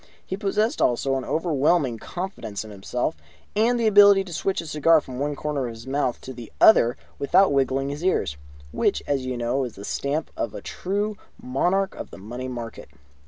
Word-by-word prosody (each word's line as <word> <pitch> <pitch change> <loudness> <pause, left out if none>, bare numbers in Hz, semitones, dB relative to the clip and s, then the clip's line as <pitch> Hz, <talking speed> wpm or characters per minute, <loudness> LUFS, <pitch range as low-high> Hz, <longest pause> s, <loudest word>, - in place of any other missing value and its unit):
He 190 - -3
possessed 210 +3 0
also 130 +2 +2
an 135 -1 -1
overwhelming 150 -5 +1
confidence 175 - -5
in 110 - -10
himself, 120 +9 -2 0.4
and 235 +3 +3
the 230 - +1
ability 200 -2 +7
to 180 -3 -9
switch 190 +4 -1
a 165 - -5
cigar 160 +1 +4
from 130 -3 -8
one 145 +1 -1
corner 145 -3 -2
of 115 - -7
his 115 +1 -11
mouth 130 -2 -1
to 130 - -8
the 120 -2 -10
other 120 - +6 0.2
without 180 +4 +4
wiggling 135 0 +1
his 145 +4 -5
ears, 180 - +1 0.4
which, - - 0
as 135 -3 -1
you 130 -1 -2
know, 120 +3 0
is 120 -4 -6
the 100 - -8
stamp 145 +7 -2
of - - -2
the - - -8
true 205 +3 -2 0.2
Monarch 180 +10 0
of - - -8
the - - -11
Money 120 +6 -6
Market. 120 -2 -7
140 Hz, 195 wpm, -24 LUFS, 125-185 Hz, 0.4 s, ability